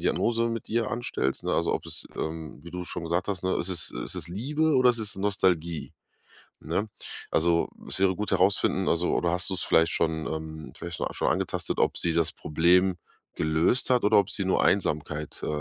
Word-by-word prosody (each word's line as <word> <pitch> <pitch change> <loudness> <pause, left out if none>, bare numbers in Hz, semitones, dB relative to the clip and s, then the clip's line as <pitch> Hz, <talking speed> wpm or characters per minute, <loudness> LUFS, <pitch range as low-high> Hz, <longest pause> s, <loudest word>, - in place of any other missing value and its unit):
Diagnose 115 0 +1
mit 115 -1 -4
ihr 115 -1 0
anstellst, 95 - -2
ne? - - 0
Also, - - +1
ob - - -4
es - - -1
ähm, 80 -2 -5
wie 85 - -10
du 90 0 -5
schon 85 -1 -5
gesagt 85 +3 -1
hast, 95 -4 -2
ne, 95 - +1
ist 90 - 0
es 85 -4 +1
ist - - -4
es 85 -3 -5
Liebe 145 - +1
oder 130 -1 +6
ist 120 - -3
es 105 -3 -3
Nostalgie, 90 -5 0 0.7
ne? 105 +3 -2 0.4
Also, 85 +1 +2 0.2
es - - -2
wäre 95 -1 +4
gut 105 +1 -3
herausfinden 95 0 +2
also, 85 +1 +1
oder 85 - +1
hast 90 +3 -1
du - - -1
es 90 - -3
vielleicht 80 +1 +3
schon 80 -1 0
ähm, 80 -1 -6
vielleicht 85 -1 -6
scho - - -2
schon - - 0
angetastet, - - -2
ob - - +2
sie 85 - +2
das 80 -1 +2
Problem 90 +4 +3 0.4
gelöst 80 +12 +2
hat 125 -3 +3
oder 105 0 +5
ob 100 0 +2
sie 100 - -1
nur 95 - +2
Einsamkeit, 75 -5 -1
äh, - - -3
90 Hz, 210 wpm, -27 LUFS, 80-105 Hz, 0.7 s, oder